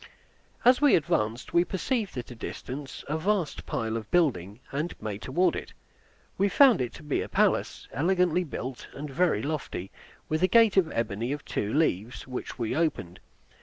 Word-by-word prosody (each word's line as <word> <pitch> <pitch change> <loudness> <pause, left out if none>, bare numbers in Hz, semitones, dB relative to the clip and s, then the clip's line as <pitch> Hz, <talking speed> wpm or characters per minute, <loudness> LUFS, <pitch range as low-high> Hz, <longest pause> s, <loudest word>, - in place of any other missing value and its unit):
As 250 +2 +6
we 290 -2 +6
advanced, 115 -6 0
we 170 - +5
perceived 200 - -2
at 125 - -5
a - - -8
distance 135 +4 -7
a 155 +2 -1
vast 185 -2 -1
pile 110 -1 -2
of 110 -2 -5
building, 115 - +1
and 150 +6 -3
made 105 -1 -5
toward 175 +8 +1
it. - - -6 0.7
We 200 +1 +3
found 255 - +6
it 125 - -2
to - - -11
be 150 -2 -1
a - - -5
palace, - - +1
elegantly 180 - +2
built, 130 -5 -6
and 145 0 -6
very 155 -7 +2
lofty, 140 - -4 0.4
with 155 +1 -1
a 185 - +5
gate 225 0 +5
of 180 -5 +3
ebony 115 +2 -2
of 145 - -7
two 105 - -2
leaves, 120 - 0
which 125 -1 -6
we 120 0 -2
opened. 140 - -1
145 Hz, 175 wpm, -28 LUFS, 115-180 Hz, 0.7 s, As